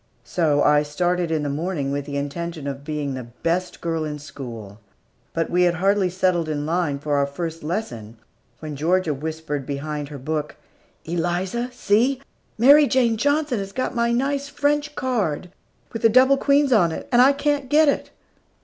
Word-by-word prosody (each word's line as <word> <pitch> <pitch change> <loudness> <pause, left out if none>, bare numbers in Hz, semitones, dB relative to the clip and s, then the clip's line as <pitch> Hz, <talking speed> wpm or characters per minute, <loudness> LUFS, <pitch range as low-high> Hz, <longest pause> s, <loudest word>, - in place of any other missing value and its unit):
So 150 -4 +1
I 150 0 +5
started 175 +4 -1
in 160 -2 0
the - - -2
morning 145 -1 -2
with 140 0 -2
the 140 -1 -4
intention 155 +2 -4
of 140 0 -5
being 150 -2 -3
the 130 -2 -6 0.2
best 175 +2 -1
girl 165 -1 -1
in 150 -1 -4
school; 115 -8 -9 0.5
but 165 0 -2
we 180 +1 +2
had 175 -1 +3
hardly 195 +1 +2
settled 180 -3 0
in 145 -1 -2
line 165 -3 0
for 145 0 -1
our 140 0 +2
first 165 +3 -5
lesson, 120 - -5 0.4
when 155 -2 -6
Georgia 165 +2 +1
whispered 150 0 -4
behind 145 +1 -4
her 145 - -7
book, 150 +2 -3 0.5
"Eliza, 175 +8 -2
see! 245 +2 +1 0.4
Mary 285 +6 +7
Jane 245 -4 +2
Johnson 285 0 +1
has 195 0 -5
got 255 +6 -2
my 235 0 +1
nice 275 +3 -1
French 295 +1 0
card, 200 - -2 0.4
with 225 - -4
the 225 - +5
double 260 +4 +5
queens 280 -1 +3
on 175 -7 +4
it, - - -6
and 245 0 +6
I 265 +2 +7
can't 285 -1 -1
get 305 +2 +5
it." 285 - 0
170 Hz, 175 wpm, -22 LUFS, 150-235 Hz, 0.5 s, Mary